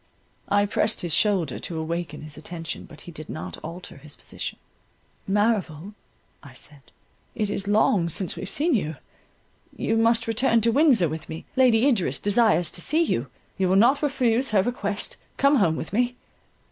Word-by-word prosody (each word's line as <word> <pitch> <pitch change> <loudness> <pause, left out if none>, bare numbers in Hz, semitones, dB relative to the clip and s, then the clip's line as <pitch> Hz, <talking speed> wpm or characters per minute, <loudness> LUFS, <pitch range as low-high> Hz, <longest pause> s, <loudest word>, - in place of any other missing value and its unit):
I 205 0 +3
pressed 210 +2 0
his 175 -3 -1
shoulder 185 - +2
to 165 - -4
awaken 160 -1 -4
his 155 -1 -7
attention, 165 +1 -7
but 155 - -13
he 175 - -10
did 155 -1 -9
not 155 - -6
alter 170 +1 -9
his 150 +1 -10
position. - - -7 0.7
"Merrival," 200 -4 0 0.5
I 140 -3 -13
said, 145 +2 -8 0.5
"it 210 -1 -1
is 200 -1 -3
long 205 -4 +3
since 180 +3 -2
we - - -8
have 190 - -5
seen 315 - +1
you—you 195 - -5
must 230 0 +3
return 230 +1 +2
to 230 +2 +3
Windsor 260 - +4
with 155 +1 -6
me—Lady 235 - +2
Idris 190 - +1
desires 205 -6 +2
to 175 - -4
see 315 - +3
you, 135 - -1 0.3
you 190 -1 +2
will 190 - +3
not 245 +8 +5
refuse 265 -3 +1
her 200 -3 +3
request—come 245 +5 -1
home 170 -8 +3
with 160 - -6
me." 245 +3 +1
200 Hz, 165 wpm, -25 LUFS, 165-230 Hz, 0.7 s, not